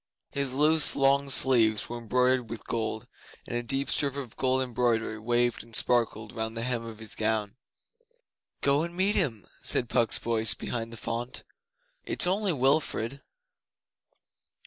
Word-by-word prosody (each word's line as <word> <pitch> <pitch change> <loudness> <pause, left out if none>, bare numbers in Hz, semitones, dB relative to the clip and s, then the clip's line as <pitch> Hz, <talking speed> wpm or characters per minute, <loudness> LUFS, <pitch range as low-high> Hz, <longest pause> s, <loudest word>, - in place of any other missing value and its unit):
His 140 -2 -2
loose 155 +2 +4
long 140 0 +2
sleeves 120 -5 +4
were 120 0 -6
embroidered 125 +1 0
with 115 - -8
gold, 110 -1 -3 0.4
and - - -5
a 120 - -1
deep 135 +3 -2
strip 140 -2 +3
of 135 -5 -7
gold 130 0 +1
embroidery 120 -3 -1
waved 120 +1 0
and 115 -1 -6
sparkled 115 -3 +3
round 110 0 -4
the 115 - -3
hem 125 -2 -2
of 110 -1 -9
his 110 0 -8
gown. 110 -1 -1 1.1
'Go 140 +1 +2
and 170 +1 -6
meet 195 +2 +1
him,' 120 - -2 0.2
said 120 - 0
Puck's 115 -2 +2
voice 110 -2 +2
behind 115 -1 -5
the 115 - -8
font. 120 +3 -4 0.6
'It's - - +1
only 195 +2 0
Wilfrid. 140 -2 0
120 Hz, 150 wpm, -27 LUFS, 115-140 Hz, 1.1 s, loose